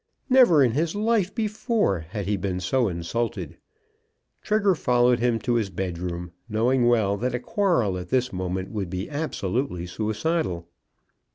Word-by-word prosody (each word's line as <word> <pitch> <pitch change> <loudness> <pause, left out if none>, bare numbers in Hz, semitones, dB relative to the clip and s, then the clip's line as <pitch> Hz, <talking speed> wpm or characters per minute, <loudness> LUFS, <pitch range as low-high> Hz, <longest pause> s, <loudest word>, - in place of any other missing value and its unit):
Never 240 - +7
in 125 - +3
his 160 - -1
life 210 -2 +1
before 215 - 0
had 95 +6 -6
he 105 +2 0
been 95 -1 -2
so 120 +6 +1
insulted. 95 +7 -3 0.8
Trigger 210 -2 +2
followed 125 -5 +3
him 120 -1 +2
to 120 - 0
his 110 -4 +1
bedroom, 90 -2 -4 0.2
knowing 120 +3 +2
well 110 -4 +2
that 125 +3 -1
a - - -1
quarrel 165 - +1
at 90 - -8
this 125 -2 +1
moment 95 0 -3
would 100 -5 -3
be 95 - -4
absolutely 125 - -2
suicidal. 105 - -2
115 Hz, 150 wpm, -25 LUFS, 95-155 Hz, 0.8 s, Never